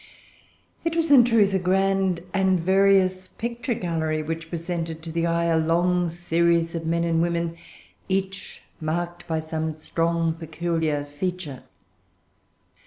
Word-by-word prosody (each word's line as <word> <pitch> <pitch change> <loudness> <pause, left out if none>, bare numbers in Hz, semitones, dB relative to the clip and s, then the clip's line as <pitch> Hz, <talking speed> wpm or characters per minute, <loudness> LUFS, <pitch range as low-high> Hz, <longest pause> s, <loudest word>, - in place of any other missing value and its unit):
It 330 0 -1
was 330 -2 +1
in 265 -4 +9
truth 220 -5 +3
a 190 - +2
grand 190 -1 +1
and 190 -1 +2
various 190 +1 +3
picture 235 +1 -3
gallery, 160 -4 -1
which 165 +1 -5
presented 165 -1 -4
to 165 - -6
the 170 +1 0
eye 170 0 +1
a 165 -1 +2
long 175 +2 +2
series 170 0 +1
of 165 -1 -4
men 170 +1 +1
and 165 -1 +1
women, 170 -1 -1 0.5
each 190 0 -3 0.2
marked 175 +2 -3
by 160 -1 0
some 160 0 -3
strong 165 +1 0
peculiar 160 -2 -2
feature. 145 -1 -4
170 Hz, 135 wpm, -24 LUFS, 165-190 Hz, 0.5 s, in